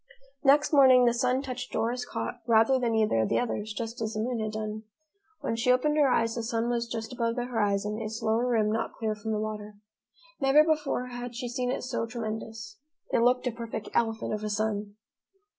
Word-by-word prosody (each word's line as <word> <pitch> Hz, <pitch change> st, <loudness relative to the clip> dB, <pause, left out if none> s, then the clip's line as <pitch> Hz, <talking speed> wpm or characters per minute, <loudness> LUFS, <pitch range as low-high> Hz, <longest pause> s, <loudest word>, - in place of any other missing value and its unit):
Next 295 Hz, +2 st, +4 dB
morning, 260 Hz, -3 st, +7 dB
the 235 Hz, -, +4 dB
sun 255 Hz, +2 st, +1 dB
touched 250 Hz, -2 st, -5 dB
Dora's 245 Hz, +2 st, -1 dB
cot 245 Hz, -, -4 dB
rather 230 Hz, +3 st, +4 dB
than 235 Hz, -2 st, 0 dB
either 215 Hz, -, +2 dB
of 110 Hz, -, +1 dB
the -, -, +2 dB
others, 215 Hz, -3 st, -2 dB
just 230 Hz, +2 st, -5 dB
as 220 Hz, 0 st, -2 dB
the 215 Hz, -, -3 dB
moon 240 Hz, +1 st, -1 dB
had 215 Hz, 0 st, -3 dB
done. 215 Hz, 0 st, -4 dB, 0.6 s
When 230 Hz, -, -1 dB
she 235 Hz, +2 st, +2 dB
opened 295 Hz, +4 st, +2 dB
her 290 Hz, -3 st, +5 dB
eyes, 230 Hz, -2 st, +2 dB
the 235 Hz, -, -3 dB
sun 230 Hz, +1 st, -1 dB
was 235 Hz, -1 st, -1 dB
just 225 Hz, 0 st, -5 dB
above 230 Hz, -1 st, -1 dB
the 245 Hz, -1 st, -2 dB
horizon, 210 Hz, -2 st, -1 dB
its 220 Hz, +1 st, -5 dB
lower 225 Hz, +3 st, +2 dB
rim 220 Hz, -3 st, +2 dB
not 225 Hz, -, -2 dB
clear 220 Hz, -1 st, -1 dB
from 215 Hz, +1 st, -5 dB
the 215 Hz, -, 0 dB
water. 210 Hz, -1 st, -5 dB, 0.6 s
Never 275 Hz, +1 st, +6 dB
before 300 Hz, -5 st, 0 dB
had 245 Hz, 0 st, -6 dB
she 245 Hz, +1 st, -4 dB
seen 245 Hz, +1 st, -2 dB
it 255 Hz, -, -2 dB
so 250 Hz, -2 st, -2 dB
tremendous! 220 Hz, -2 st, -6 dB, 0.3 s
It -, -, +4 dB
looked 250 Hz, +2 st, +3 dB
a 250 Hz, -, +1 dB
perfect 230 Hz, -2 st, -6 dB
elephant 225 Hz, -1 st, 0 dB
of 210 Hz, 0 st, -3 dB
a 215 Hz, -, -2 dB
sun. 210 Hz, -1 st, -2 dB
230 Hz, 210 wpm, -28 LUFS, 220-250 Hz, 0.6 s, morning